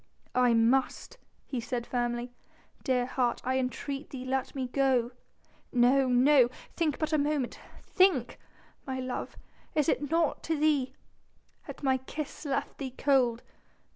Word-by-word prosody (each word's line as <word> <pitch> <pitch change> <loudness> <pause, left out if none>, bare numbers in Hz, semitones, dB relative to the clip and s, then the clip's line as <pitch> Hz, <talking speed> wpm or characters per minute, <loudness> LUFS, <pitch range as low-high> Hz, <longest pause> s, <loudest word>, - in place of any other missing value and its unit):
"I 250 -2 +4
must," 260 - +1 0.3
he 260 - -4
said 240 0 -3
firmly. 240 0 -2 0.5
"Dear 255 -3 +1
heart, 250 -1 0
I 260 +1 +1
entreat 275 +3 -4
thee 255 -2 -7
let 265 +1 -2
me 260 -2 -2
go." 255 -2 +1 0.6
"No 255 +2 +4
no... 250 0 +5 0.3
think 315 -5 0
but 310 0 -2
a 305 - +3
moment... 285 -3 -1 0.2
think!... 345 -11 +2 0.5
My 260 -1 -3
love?... 255 -1 -5 0.4
is 300 -1 +2
it 290 -3 0
naught 330 -1 +1
to 320 -1 0
thee?... 285 -4 +1 0.7
Has - - -9
my 265 -1 +3
kiss 290 +4 -7
left 275 -1 -2
thee 260 -3 -5
cold?... 250 -4 +2
260 Hz, 140 wpm, -29 LUFS, 245-290 Hz, 0.7 s, no